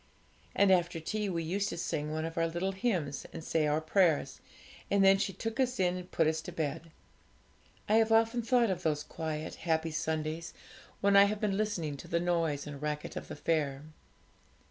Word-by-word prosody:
And 200 -1 +5
after 175 -2 +2
tea 210 +5 -2
we 170 -2 -2
used 195 +5 -1
to - - -5
sing 150 -3 -2
one 155 +1 -2
of 165 0 -5
our 165 0 +1
little 175 +4 -2
hymns 185 - -2
and 165 - -7
say 155 -1 +1
our 150 +1 +2
prayers, 160 -4 +1 0.5
and 200 -1 +4
then 195 0 +6
she 195 - 0
took 225 +6 -5
us 255 -1 +1
in 180 -1 +2
and 180 0 -7
put 165 - +2
us 155 0 +1
to - - -8
bed. 160 +1 -3 1.0
I 215 - +4
have 225 0 +3
often 225 +2 +3
thought 235 -2 +3
of 180 -1 -3
those 150 -3 0
quiet, 160 -1 -5
happy 160 -1 0
Sundays 155 +1 -3 0.5
when 200 0 +4
I 200 0 +9
have 210 +1 -1
been 205 -2 0
listening 180 -9 -2
to - - -10
the 170 - 0
noise 165 -4 0
and 145 -1 -8
racket 150 0 -3
of - - -6
the - - -7
fair. 145 -4 -1
170 Hz, 200 wpm, -31 LUFS, 155-200 Hz, 1.0 s, I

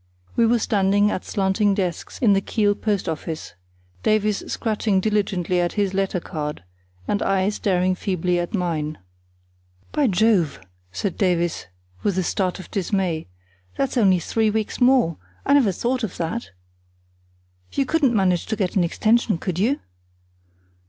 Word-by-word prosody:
We 230 - +4
were 240 +1 +4
standing 205 -1 +2
at - - -3
slanting 195 +1 +1
desks 185 -4 -3
in 220 -5 +4
the 195 - +2
Kiel 205 0 +1
post 205 -2 -1
office, 160 0 -4 0.5
Davies 215 -1 +1
scratching 215 -3 0
diligently 190 -4 0
at 175 - -1
his 200 -2 0
letter 195 -1 0
card, 150 - -5 0.4
and 205 - 0
I 195 0 +2
staring 185 -3 +1
feebly 180 -1 -1
at 175 +5 -2
mine. 155 -5 -2 0.9
"By 295 -3 +2
Jove!" 195 -6 +2 0.3
said 190 - -3
Davies, 175 - 0 0.3
with 200 -3 0
a 185 - +2
start 185 +1 -1
of 185 - -11
dismay; 185 -4 -1 0.5
"that's 275 -1 -1
only 195 -6 +4
three 220 +6 0
weeks 220 +3 -2
more; 245 - +4 0.3
I 280 - +3
never 265 -8 +5
thought 245 +7 -1
of 210 - -4
that. 175 +8 -3 1.2
You 275 - 0
couldn't 275 -4 +2
manage 185 -4 +2
to 220 - -1
get 190 -4 -2
an 190 - +4
extension, 215 +4 +2
could 180 +1 -3
you?" 250 +8 +1
195 Hz, 150 wpm, -23 LUFS, 180-220 Hz, 1.2 s, never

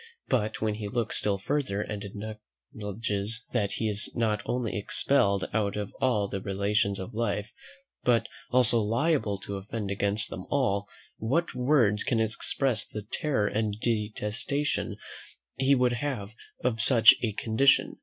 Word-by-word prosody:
But 110 -4 0
when 110 -1 +1
he 105 0 -5
looks 115 +2 -1
still 100 -1 0
further 130 -1 -1
and 105 0 -4
acknowledges 105 - -4
that 105 -5 0
he 110 - -1
is 105 0 -1
not 110 -2 +1
only 125 -3 -1
expelled 100 -2 +2
out 105 -2 0
of 105 -1 -4
all 110 -6 +2
the 100 -1 -4
relations 100 +1 0
of 95 +5 -6
life, 105 -2 -2 0.5
but 115 -2 +3 0.2
also 120 -2 +4
liable 115 0 +1
to 100 - -5
offend 100 +1 -5
against 100 +2 0
them - - -7
all; 100 -8 +1 0.3
what 140 +10 0
words 125 -5 +3
can 115 - +1
express 115 +1 +1
the 105 - -7
terror 110 0 -1
and 105 0 -1
detestation 115 +6 -1 0.6
he 135 +1 +4
would 125 -1 +2
have 120 -5 -3 0.3
of 115 -3 +1
such 115 -2 +8
a 110 -3 -1
condition? 120 +7 +3
110 Hz, 145 wpm, -28 LUFS, 100-125 Hz, 0.6 s, such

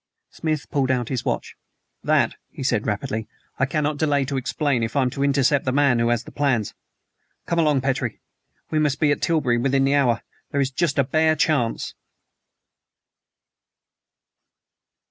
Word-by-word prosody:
Smith 155 -3 -3
pulled 135 -2 +1
out 125 -3 0
his 130 -4 -2
watch. - - -3 0.5
"That," - - +2 0.2
he - - -8
said 120 -4 0
rapidly, 110 +1 -2 0.3
"I 135 - +2
cannot 150 0 -1
delay 145 -3 +1
to 140 +1 -3
explain 135 0 0
if 115 +3 -3
I'm 130 -3 +2
to 140 - -2
intercept 140 0 +2
the 130 - 0
man 135 -3 +3
who 115 0 +2
has 120 -1 +1
the - - -12
plans. 130 -8 0 0.7
Come 170 - 0
along, 150 -4 +3
Petrie; 130 -3 -2 0.5
we 155 - +2
must 150 -3 +1
be 150 -2 +3
at 145 - -1
Tilbury 140 -8 +1
within 135 +2 +2
the 140 - +2
hour. 125 -5 +2 0.3
There 140 - -1
is 135 -1 +1
just 150 +2 0
a 140 - +4
bare 155 +4 +2
chance." 140 -8 0
135 Hz, 165 wpm, -23 LUFS, 125-145 Hz, 0.7 s, a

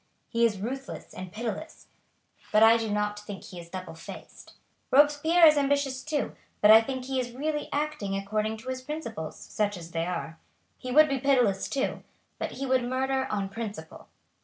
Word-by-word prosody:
He 235 0 +3
is 210 -3 -4
ruthless 265 +6 -6
and 185 -1 -8
pitiless, 225 - -5 0.7
but 215 +1 +6
I 225 +1 +8
do 225 -1 -1
not 210 0 -1
think 205 -2 -8
he 180 - -9
is 170 0 -11
double 185 -2 -7
faced. 165 - -11 0.4
Robespierre 295 +5 +5
is 305 -1 +7
ambitious 280 -2 +1
too, 305 -2 -2 0.2
but 210 - +7
I 220 +1 +10
think 260 +2 -4
he 265 0 -1
is 245 -1 -3
really 295 +3 -2
acting 290 -10 -2
according 215 +2 -2
to 225 +4 -8
his 260 0 -3
principles, 255 - -6
such 205 -2 -2
as 170 -1 -10
they 165 0 -1
are. 165 -2 -4 0.4
He 255 - -5
would 305 +4 +7
be 275 -2 -1
pitiless 245 -8 +2
too, 275 -1 -1 0.4
but - - -3
he 275 - -4
would 260 -1 +2
murder 265 +2 0
on 200 -2 -1
principle. 205 -6 -7
235 Hz, 185 wpm, -28 LUFS, 205-270 Hz, 0.7 s, I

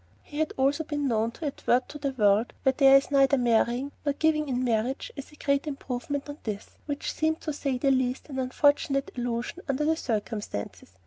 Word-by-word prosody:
He 295 - -7
had 315 - +1
also 275 +4 +2
been 295 -2 -2
known 225 -2 +1
to 320 - -7
advert 255 -3 +1
to 295 - -8
the 280 -1 -1
world 210 -1 +3
where 265 - +4
there 275 -1 +7
is 275 - -1
neither 275 0 +5
marrying 245 +2 +2
nor 285 -1 +1
giving 305 0 +1
in 250 -1 0
marriage 240 +2 -1
as 275 - -8
a - - -15
great 280 0 0
improvement 275 0 -4
on 290 +1 -8
this, 210 -2 -5 0.2
which 285 -1 -3
seemed, 315 0 0
to 305 - -3
say 275 -2 -1
the 275 +2 +2
least, 260 -1 0
an 270 -3 -5
unfortunate 275 +2 +2
allusion 240 +6 -3
under 275 +2 +1
the 320 +1 +3
circumstances. 210 - -4
275 Hz, 200 wpm, -27 LUFS, 245-290 Hz, 0.2 s, there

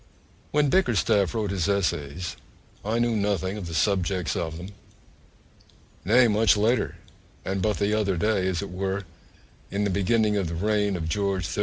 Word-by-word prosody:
When 145 -2 +2
Bickerstaff 110 - +2
wrote 105 -3 -1
his 95 -1 -1
Essays 85 -4 -1 0.5
I 110 +3 -1
knew 120 -1 +1
nothing 100 -2 0
of 100 -5 -6
the 85 - -5
subjects 90 -5 0
of 80 -1 -3
them; 90 +3 -8 1.3
nay, 120 +5 +5
much 110 0 +4
later, 115 +4 +1 0.5
and 95 0 -2
but 105 +1 +1
the 105 +1 +1
other 100 -4 +1
day, 100 0 +1
as 95 0 -1
it 100 - -7
were, 95 +2 -2 0.7
in 100 +2 -1
the 100 - 0
beginning 105 +2 +2
of 95 -4 0
the 85 - -4
reign 105 +2 +1
of 80 -2 -4
George 95 0 -1
III. - - -3
100 Hz, 170 wpm, -25 LUFS, 90-105 Hz, 1.3 s, nay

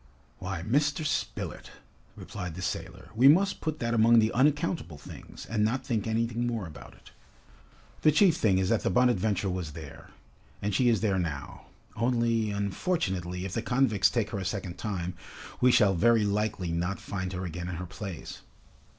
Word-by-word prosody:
"Why, 85 - -4
Mr. 145 - +1
Spilett," 150 - -3 0.5
replied 90 -5 -7
the 90 - -6
sailor, 90 0 -5
"we 120 +5 +5
must 190 +7 +4
put 155 -1 -2
that 115 -3 -1
among 115 +1 +5
the 110 0 +4
unaccountable 145 - +1
things, 70 - -11
and 110 -2 0
not 120 +5 0
think 110 -3 -1
anything 115 +1 0
more 115 -5 -2
about 75 -4 -11
it. - - -18 0.9
The 155 - +5
chief 170 +1 +5
thing 100 -4 +2
is 95 0 +1
that 115 - +2
the - - 0
'Bonadventure' 110 -5 +2
was 90 -4 -4
there, 80 -3 -10 0.5
and 105 0 -2
she 125 +5 +3
is 115 -4 +2
there 100 -4 +1
now. 75 -6 -5 0.3
Only, 115 -2 +1
unfortunately, 95 - -2
if 95 - -5
the 115 - -1
convicts 115 -5 +2
take 110 -3 -1
her 100 - -3
a - - -4
second 95 -2 -4
time, 90 -4 -3 0.5
we 125 0 +6
shall 100 -4 +5
very 115 +4 +4
likely 100 -4 -1
not 85 +3 -2
find 95 -2 -4
her 90 0 -4
again 90 +1 -5
in 90 - -4
her 90 +2 -5
place!" 95 -1 -7
105 Hz, 175 wpm, -28 LUFS, 90-120 Hz, 0.9 s, we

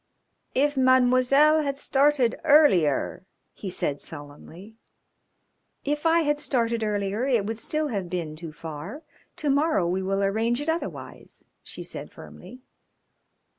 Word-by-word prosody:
"If 290 +2 +2
Mademoiselle 260 +4 +4
had 280 -2 -2
started 275 -3 +2
earlier 280 - +3 0.2
" - - -50
he 195 - -7
said 145 -5 -2
sullenly. 160 +7 -11 1.1
"If 295 +3 0
I 335 +1 +4
had 295 -1 0
started 235 -5 -1
earlier 205 +3 -1
it 235 -7 +1
would 220 +1 -4
still 305 +4 -2
have 195 -7 -3
been 170 -4 -4
too 165 0 -8
far. 165 - -8 0.3
To 295 -2 -1
morrow 280 - +2
we 185 +2 -1
will 195 +1 -1
arrange 225 +5 0
it 295 +2 -3
otherwise," 330 +1 -6 0.2
she - - -9
said - - -8
firmly. 255 0 -13
240 Hz, 135 wpm, -25 LUFS, 190-290 Hz, 1.1 s, Mademoiselle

